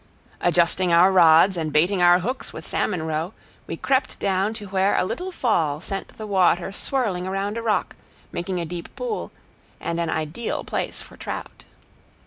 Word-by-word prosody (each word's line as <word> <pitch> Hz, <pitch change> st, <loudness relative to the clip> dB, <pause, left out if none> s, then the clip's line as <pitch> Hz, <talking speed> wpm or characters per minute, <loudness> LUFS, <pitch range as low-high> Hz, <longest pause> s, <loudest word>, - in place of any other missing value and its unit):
Adjusting 175 Hz, +1 st, +2 dB
our 175 Hz, +3 st, +6 dB
rods, 170 Hz, +1 st, +6 dB
and 160 Hz, -3 st, -2 dB
baiting 180 Hz, +6 st, +2 dB
our 175 Hz, 0 st, +7 dB
hooks 255 Hz, +7 st, -3 dB
with -, -, -9 dB
salmon 180 Hz, -6 st, -1 dB
roe, 160 Hz, +4 st, -3 dB, 0.3 s
we -, -, -4 dB
crept 265 Hz, 0 st, 0 dB
down 195 Hz, +1 st, +1 dB
to 210 Hz, -2 st, -7 dB
where 190 Hz, +1 st, +2 dB
a -, -, +2 dB
little 365 Hz, -, -4 dB
fall 165 Hz, -, +1 dB
sent 195 Hz, +3 st, -5 dB
the 215 Hz, -, -6 dB
water 185 Hz, -2 st, +2 dB
swirling 200 Hz, -5 st, -1 dB
around 195 Hz, +2 st, -2 dB
a 230 Hz, -, -3 dB
rock, 220 Hz, -2 st, 0 dB, 0.4 s
making 180 Hz, +1 st, -3 dB
a 170 Hz, -, -2 dB
deep 170 Hz, +1 st, -7 dB
pool, 485 Hz, -4 st, -4 dB, 0.5 s
and 170 Hz, 0 st, -3 dB
an 170 Hz, -1 st, -1 dB
ideal 160 Hz, +8 st, -3 dB
place -, -, -4 dB
for -, -, -15 dB
trout. -, -, -7 dB
185 Hz, 170 wpm, -23 LUFS, 170-205 Hz, 0.5 s, our